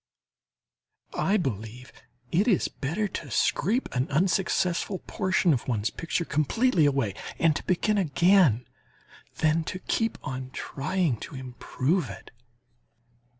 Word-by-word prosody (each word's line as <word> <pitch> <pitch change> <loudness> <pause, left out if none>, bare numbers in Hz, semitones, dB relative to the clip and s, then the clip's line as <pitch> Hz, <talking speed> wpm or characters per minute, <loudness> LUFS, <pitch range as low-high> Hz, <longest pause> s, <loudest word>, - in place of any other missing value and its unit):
I 205 +3 +2
believe 125 - -4 0.4
it 195 +7 +2
is 205 -7 +3
better 170 +10 -2
to - - -6
scrape 225 - +1
an 125 +1 0
unsuccessful 180 +3 +1
portion 185 -4 +2
of 125 - -2
one's 110 -4 0
picture 165 0 -2
completely 160 - +2
away 135 -8 0 0.2
and 165 -2 +3
to - - -3
begin 205 +3 +1
again, 170 - +4 0.7
than 160 +1 +2
to 185 - -4
keep 225 +4 -1
on 130 -2 -5
trying 155 -2 -1
to 135 - -9
improve 130 +4 -2
it. - - -10
160 Hz, 120 wpm, -27 LUFS, 130-190 Hz, 0.7 s, again